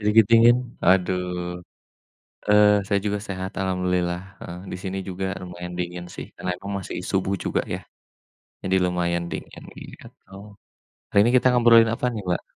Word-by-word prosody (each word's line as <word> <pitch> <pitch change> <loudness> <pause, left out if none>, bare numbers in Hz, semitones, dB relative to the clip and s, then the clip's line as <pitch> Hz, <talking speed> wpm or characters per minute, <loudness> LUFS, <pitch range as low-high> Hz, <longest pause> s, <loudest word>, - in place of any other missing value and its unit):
Sedikit 105 +1 +5
dingin? 115 +1 +7 0.3
Aduh. 90 -1 +1 0.9
Eee, 105 0 +6
saya 100 -1 +1
juga 105 0 0
sehat 95 0 -4
alhamdulillah, 90 -2 0 0.2
heeh. 85 - -8
Di - - -3
sini 95 -1 -4
juga 95 +1 -3
lumayan 90 -1 -7
dingin 90 0 -4
sih, - - -6
karena 90 - -3
emang 100 +2 -7
masih 95 - -6
subuh 95 0 0
juga - - 0
ya, - - -4 0.8
jadi 95 0 +2
lumayan 85 -1 0
dingin, - - -7 0.2
gitu. - - -11 1.1
Hari 100 - +5
ini 110 - +4
kita 130 - +5
ngobrolin 115 -2 +7
apa 120 - -2
nih, 110 - -4
Mbak? 90 -1 0
95 Hz, 155 wpm, -24 LUFS, 90-105 Hz, 1.1 s, dingin